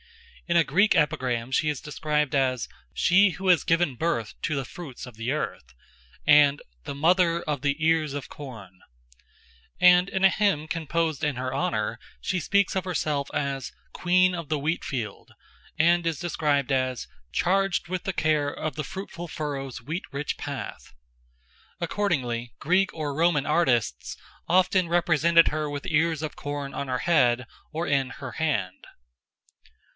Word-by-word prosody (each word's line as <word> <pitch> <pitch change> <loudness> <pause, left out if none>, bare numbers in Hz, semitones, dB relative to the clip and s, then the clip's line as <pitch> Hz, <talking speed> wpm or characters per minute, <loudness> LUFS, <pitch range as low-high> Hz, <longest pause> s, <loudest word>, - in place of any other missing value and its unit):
In 170 0 +3
a 170 - +6
Greek 190 +10 +3
epigram 130 -5 0
she 150 +3 +2
is 150 -3 -2
described 150 -1 -1
as 130 -3 +1 0.2
"she 195 +3 +4
who 190 +1 -4
has 180 - +5
given 165 -5 +1
birth 120 -7 -1
to 155 - -1
the 135 -2 -2
fruits 140 -2 -9
of 125 -3 -12
the 115 +3 -3
earth," 65 - -4 0.5
and 145 -1 +6 0.2
"the - - -6
mother 170 +2 +3
of 150 -4 -2
the 140 0 0
ears 160 -3 +2
of 145 -1 -5
corn"; 110 -10 -11 1.0
and 180 +1 +6
in 190 0 +1
a - - +8
hymn 190 -7 +1
composed 165 -1 -1
in 150 -4 0
her 130 +1 -3
honour 110 -6 -1 0.2
she 185 - -1
speaks 200 +3 +1
of 190 - 0
herself 150 -6 -1
as 135 -3 -2 0.2
"queen 185 +1 +3
of 165 -4 -6
the 155 -2 0
wheat 155 +4 -1
field," 110 -7 -5 0.5
and 170 +2 +3
is 165 -3 -1
described 150 -6 0
as 130 - 0 0.2
"charged 195 0 +1
with 185 0 -3
the 195 - -1
care 155 -4 +1
of 155 +1 -4
the 155 - -3
fruitful 175 +1 -7
furrow's 140 -4 -5
wheat 160 +8 -4
rich 140 +2 -3
path." 140 -3 -7 0.9
Accordingly, 130 - -1
Greek 185 +5 +2
or 150 -3 -3
Roman 160 -3 +2
artists 130 - +1 0.3
often 185 0 +3
represented 170 -1 +4
her 150 0 -2
with 145 -1 -5
ears 160 0 +1
of 155 - -4
corn 145 -1 -5
on 140 - -4
her 125 0 -1
head 125 -7 +3 0.3
or 165 +2 -3
in 135 -2 +1
her 130 -2 -8
hand. 105 -13 -2
150 Hz, 160 wpm, -26 LUFS, 135-170 Hz, 1.0 s, a